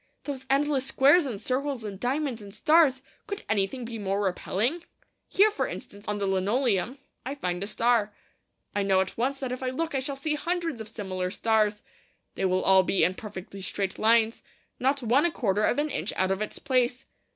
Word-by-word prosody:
Those 265 -2 -6
endless 275 -1 +2
squares 285 +4 +5
and 225 -6 -4
circles 265 0 -2
and 200 -3 -6
diamonds 260 -1 -1
and 200 -1 -10
stars! 270 +3 +4 0.2
Could 405 -1 -5
anything 220 +4 0
be 230 -1 -6
more 200 0 -1
repelling? 215 - -1 0.4
Here, 420 +3 +4
for 425 - -1
instance, 205 +1 -8
on 210 0 -1
the 200 - -1
linoleum, 205 +4 +1 0.3
I 270 +2 -4
find 180 -8 -2
a - - -4
star. 230 -1 +2 0.6
I 205 - +2
know 195 -1 +3
at 190 - -3
once 270 +4 -1
that 260 -2 -3
if 255 - -4
I 260 - -1
look 320 +5 -3
I 270 - +1
shall 275 +1 -3
see 300 +3 -2
hundreds 330 -4 -2
of 220 - -7
similar 190 -4 -3
stars. 215 0 +1 0.5
They - - -2
will 185 0 +1
all 190 0 +6
be 185 +1 +1
in 180 - +3
perfectly 195 -2 -8
straight 190 +1 -3
lines, 225 +1 +3 0.4
not 270 +1 +1
one 245 +5 +4
a - - -3
quarter 210 -8 0
of 230 - +2
an 295 +1 0
inch - - -2
out 190 0 +2
of 195 +2 -1
its 215 - -4
place. 255 -1 0
235 Hz, 200 wpm, -27 LUFS, 200-275 Hz, 0.6 s, all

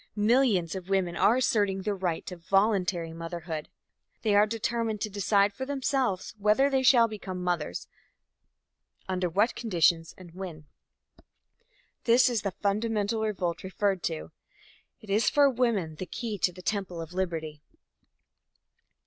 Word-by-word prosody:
Millions 210 -5 +2
of 190 -1 -7
women 185 -3 +1
are 215 +6 +4
asserting 205 -7 +1
their 210 - 0
right 180 -4 -2
to 180 - -6
voluntary 180 -2 +1
motherhood. 165 -1 -6 0.5
They 215 -2 +2
are 205 +1 +5
determined 225 0 -2
to 215 - -2
decide 200 0 +2
for 265 - -5
themselves 265 -7 -1
whether 215 +7 +3
they 265 -1 +2
shall 250 -3 +6
become 190 -4 -6
mothers, 170 - -2 1.2
under 185 -1 -1
what 205 +8 +2
conditions 170 -6 +1
and 175 -3 -13
when. 175 -5 -8 1.4
This 245 +2 +5
is 230 -4 0
the 200 - -1
fundamental 210 +2 -1
revolt 185 -6 -2
referred 190 0 -1
to. 80 +1 -4 0.7
It 215 - -9
is 210 +3 +3
for 290 -1 +5
woman 220 -11 0
the 185 - -5
key 220 -1 -5
to 180 - +2
the 180 +1 -13
temple 195 -4 -2
of 165 +1 -7
liberty. 160 -5 -3
195 Hz, 140 wpm, -28 LUFS, 175-225 Hz, 1.4 s, shall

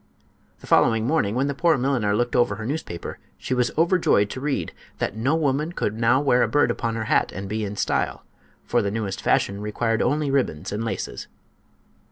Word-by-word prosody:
The - - -12
following 115 -1 +3
morning 120 -7 +1
when 130 +2 +1
the 140 - -1
poor 165 +2 +2
milliner 125 -6 +1
looked 120 +2 0
over 120 -1 +3
her 110 - -6
newspaper 130 - -5 0.2
she - - -3
was 125 -1 +2
overjoyed 165 - +3
to 130 - -6
read 145 -1 -2 0.2
that - - -2
"no 130 +8 +1
woman 150 +1 0
could 105 - -1
now 115 +3 +3
wear 135 -3 +3
a - - +3
bird 145 0 +2
upon 115 -1 -2
her 110 - -2
hat - - +1
and 95 +1 -6
be 110 +2 -2
in 100 0 -4
style, - - -1 0.4
for - - +1
the 100 - -1
newest 100 -2 -3
fashion 100 +1 +1
required 110 +2 -1
only 150 -1 +1
ribbons 95 - -1
and 105 +2 -2
laces." 105 -5 -4
120 Hz, 200 wpm, -24 LUFS, 105-140 Hz, 0.4 s, following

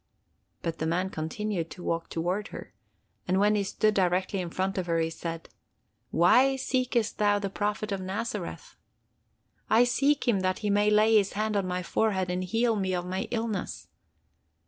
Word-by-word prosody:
But 165 -1 -3
the 160 - -1
man 180 +3 0
continued 170 +2 -3
to 180 - -10
walk 165 0 -2
towards 180 +5 -2
her, - - -9 0.5
and 185 +1 +2
when 205 +1 +4
he 210 - +2
stood 215 +2 +1
directly 185 0 +1
in 175 - -4
front 190 +2 -1
of 180 - -3
her, 165 -1 +1
he 165 0 0
said: 165 0 -6 0.6
'Why 250 +11 +5
seekest 250 -4 -1
thou 205 -1 +3
the 200 -1 -3
Prophet 210 +1 -2
of 195 -1 -2
Nazareth?'—'I 210 +3 -4
seek 275 +3 +2
him 220 -5 +3
that 185 0 0
he 205 - +2
may 205 +1 +3
lay 215 +1 +4
his 200 -2 +1
hand 215 +1 -1
on 195 -2 0
my 180 0 -2
forehead 190 -1 0
and 180 +1 -1
heal 225 +5 +1
me 190 -3 -1
of 175 0 -3
my 185 +1 -3
illness. 225 -5 -3
195 Hz, 175 wpm, -28 LUFS, 180-215 Hz, 0.6 s, Why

